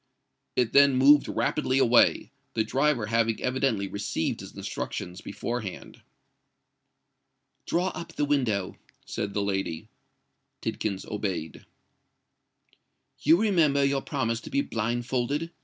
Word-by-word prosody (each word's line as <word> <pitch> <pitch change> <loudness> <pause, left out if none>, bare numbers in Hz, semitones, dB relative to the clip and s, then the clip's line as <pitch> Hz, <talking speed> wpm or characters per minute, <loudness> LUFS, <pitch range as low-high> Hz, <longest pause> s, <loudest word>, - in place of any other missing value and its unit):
It 125 -3 +1
then 140 -1 +6
moved 140 +3 +6
rapidly 135 -3 0
away—the 120 -2 +2
driver 130 +1 +1
having 115 0 +1
evidently 125 -6 0
received 100 -4 -2
his - - -10
instructions 90 +4 -5
before 120 +2 -4
hand. 100 -4 -9 1.7
"Draw 180 +2 +1
up 170 -1 -8
the 145 - 0
window," 120 -10 0 0.3
said 100 -1 -4
the 100 - +1
lady. 95 -5 -3 0.7
Tidkins 100 -3 -3
obeyed. 95 -7 -4 1.5
"You 165 +2 +5
remember 165 -10 +3
your 140 0 +1
promise 115 -6 -2
to - - -9
be 280 +1 +1
blindfolded?" 120 - -2
120 Hz, 110 wpm, -27 LUFS, 105-140 Hz, 1.7 s, then